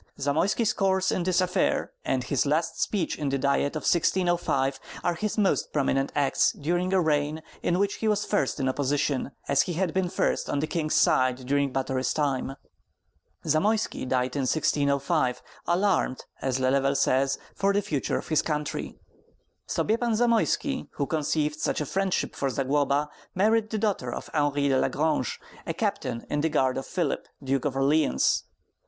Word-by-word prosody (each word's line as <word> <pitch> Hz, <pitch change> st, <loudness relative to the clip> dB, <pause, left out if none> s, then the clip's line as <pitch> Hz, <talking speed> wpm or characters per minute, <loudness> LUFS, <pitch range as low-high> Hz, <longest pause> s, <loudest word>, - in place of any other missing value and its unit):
Zamoyski's 170 Hz, -, +1 dB
course 190 Hz, -1 st, +1 dB
in -, -, 0 dB
this 185 Hz, +1 st, +2 dB
affair, 185 Hz, +1 st, 0 dB
and 130 Hz, -1 st, 0 dB
his 135 Hz, +3 st, 0 dB
last 155 Hz, +3 st, 0 dB
speech 190 Hz, -7 st, -1 dB
in 145 Hz, -2 st, -1 dB
the 135 Hz, -, 0 dB
Diet 140 Hz, +2 st, +1 dB
of 155 Hz, -, -3 dB
1605 170 Hz, -6 st, +1 dB, 0.2 s
are 175 Hz, -, +1 dB
his 210 Hz, +6 st, -3 dB
most 200 Hz, -3 st, +1 dB
prominent 135 Hz, -1 st, +1 dB
acts 140 Hz, -2 st, +2 dB
during 175 Hz, +5 st, -1 dB
a 190 Hz, -, +4 dB
reign 155 Hz, -1 st, 0 dB, 0.2 s
in 175 Hz, -, +1 dB
which 200 Hz, +1 st, 0 dB
he 220 Hz, -, -2 dB
was 210 Hz, -1 st, +1 dB
first 205 Hz, -, 0 dB
in 135 Hz, -, 0 dB
opposition, 140 Hz, 0 st, 0 dB, 0.2 s
as 140 Hz, -1 st, +4 dB
he 175 Hz, -, -2 dB
had 175 Hz, -1 st, -1 dB
been 185 Hz, -1 st, 0 dB
first -, -, 0 dB
on -, -, 0 dB
the 145 Hz, -, 0 dB
king's 155 Hz, -1 st, -1 dB
side 130 Hz, 0 st, +3 dB
during 140 Hz, +1 st, +1 dB
Batory's 130 Hz, 0 st, -1 dB
time. 135 Hz, -3 st, -1 dB, 0.9 s
Zamoyski 190 Hz, +1 st, +1 dB
died 125 Hz, 0 st, 0 dB
in 135 Hz, -2 st, 0 dB
1605, 140 Hz, -3 st, +1 dB, 0.2 s
alarmed, 175 Hz, -7 st, +1 dB, 0.2 s
as 130 Hz, -1 st, 0 dB
Lelevel 135 Hz, +1 st, +2 dB
says, 135 Hz, +1 st, +2 dB, 0.2 s
for 200 Hz, 0 st, +1 dB
the 205 Hz, +1 st, +1 dB
future 145 Hz, -6 st, -1 dB
of -, -, -7 dB
his 155 Hz, -2 st, +3 dB
country. 150 Hz, -2 st, -3 dB, 0.7 s
Sobiepan 230 Hz, +1 st, 0 dB
Zamoyski, 240 Hz, +4 st, +1 dB
who 140 Hz, -, -1 dB
conceived 150 Hz, 0 st, -1 dB
such -, -, 0 dB
a 150 Hz, -, -1 dB
friendship 190 Hz, +4 st, -1 dB
for 135 Hz, -, -1 dB
Zagloba, 140 Hz, +3 st, +1 dB, 0.3 s
married 215 Hz, +3 st, +2 dB
the 220 Hz, -, -2 dB
daughter 200 Hz, -, -1 dB
of -, -, -7 dB
Henri 145 Hz, -1 st, +1 dB
de 135 Hz, -1 st, +3 dB
la -, -, +2 dB
Grange, 155 Hz, -4 st, 0 dB, 0.3 s
a -, -, -2 dB
captain 115 Hz, -, -2 dB
in 145 Hz, -, -1 dB
the 160 Hz, -, +1 dB
guard 130 Hz, -4 st, +1 dB
of 135 Hz, -, -8 dB
Philip, 170 Hz, -6 st, -2 dB, 0.2 s
Duke 135 Hz, 0 st, 0 dB
of 140 Hz, -2 st, -1 dB
Orleans. 135 Hz, -, +2 dB
150 Hz, 170 wpm, -26 LUFS, 135-185 Hz, 0.9 s, a